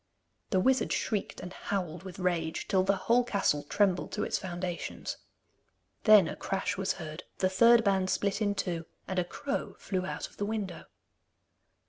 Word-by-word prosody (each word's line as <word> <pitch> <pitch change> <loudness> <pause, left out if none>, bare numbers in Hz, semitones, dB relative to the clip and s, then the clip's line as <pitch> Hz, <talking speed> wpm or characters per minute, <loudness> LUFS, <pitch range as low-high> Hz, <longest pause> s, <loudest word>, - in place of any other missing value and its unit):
The 190 - +2
wizard 260 +7 +2
shrieked 210 -3 -1
and 180 +1 -7
howled 180 -5 -3
with 185 -2 -9
rage, 170 -3 -1
till 190 - +3
the 195 +1 +2
whole 245 +2 +5
castle 200 -10 +1
trembled 185 +4 +1
to 210 - -1
its - - -1
foundations. 175 -1 -4 0.9
Then 210 -6 +8
a - - -4
crash 195 0 -2
was 195 -1 0
heard, 160 -1 -7 0.2
the 185 - +2
third 235 +4 +6
band 190 -2 +2
split 200 +2 0
in 205 -1 +1
two, 170 -4 -2 0.2
and 190 -1 -1
a - - +2
crow 275 +10 -4
flew 185 -2 -2
out 185 - -4
of - - -21
the 205 - -1
window. 205 -5 -4
190 Hz, 170 wpm, -30 LUFS, 180-205 Hz, 0.9 s, Then